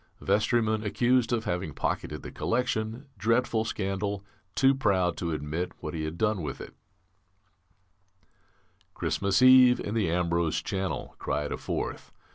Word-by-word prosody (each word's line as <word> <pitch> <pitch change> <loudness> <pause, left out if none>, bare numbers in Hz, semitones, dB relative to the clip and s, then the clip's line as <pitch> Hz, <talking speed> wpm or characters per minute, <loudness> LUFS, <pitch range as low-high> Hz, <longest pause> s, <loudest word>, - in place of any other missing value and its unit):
Vestryman 110 0 +1
accused 120 +3 +2
of 115 -2 0
having 90 -4 -2
pocketed 75 - -3
the - - -7
collection, 120 +1 -1
dreadful 115 0 +2
scandal, 100 -1 -2 0.3
too 135 0 +5
proud 95 -9 +1
to 85 -2 -2
admit 80 +4 -3
what 75 - -5
he 80 -2 -3
had 80 +2 -5
done 105 -2 +1
with 70 -3 -5
it - - -9 1.5
" - - -38
"Christmas 100 +5 +1
Eve 130 -1 +8
in 105 - -4
the 110 -7 +1
Ambrose 85 -1 +1
Channel," 95 -1 -3
cried 75 +1 -2
a - - -2
fourth. - - -4
100 Hz, 140 wpm, -28 LUFS, 85-115 Hz, 1.5 s, Eve